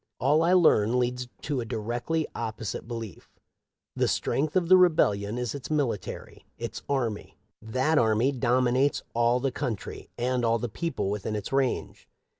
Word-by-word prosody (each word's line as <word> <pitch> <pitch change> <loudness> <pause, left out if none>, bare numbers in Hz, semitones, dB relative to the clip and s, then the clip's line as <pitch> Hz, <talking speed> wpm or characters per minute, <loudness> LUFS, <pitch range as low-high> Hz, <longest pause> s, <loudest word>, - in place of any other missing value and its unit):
All 145 +5 +3
I 170 +2 +3
learn 125 - +4
leads 125 0 -1 0.2
to 145 -3 -1
a - - -5
directly 120 +9 -2
opposite 110 -1 -5
belief. 115 -6 -7 0.7
The - - +1
strength 150 +2 0
of 180 -2 +2
the 185 - +8
rebellion 115 - +3
is 125 -3 -2
its 140 - -7
military 140 -10 -3
— - - -44
its - - -5
army. 120 -7 -2 0.2
That 130 +8 +1
army 115 +3 +3
dominates 130 +1 +1
all 120 +1 +3
the 135 +1 -1
country 115 -4 -5
and 125 +1 0
all 115 0 +3
the 120 +1 -4
people 110 -5 -2
within 105 +1 -3
its 105 +5 -5
range. 135 -2 -1
125 Hz, 160 wpm, -27 LUFS, 115-140 Hz, 0.7 s, the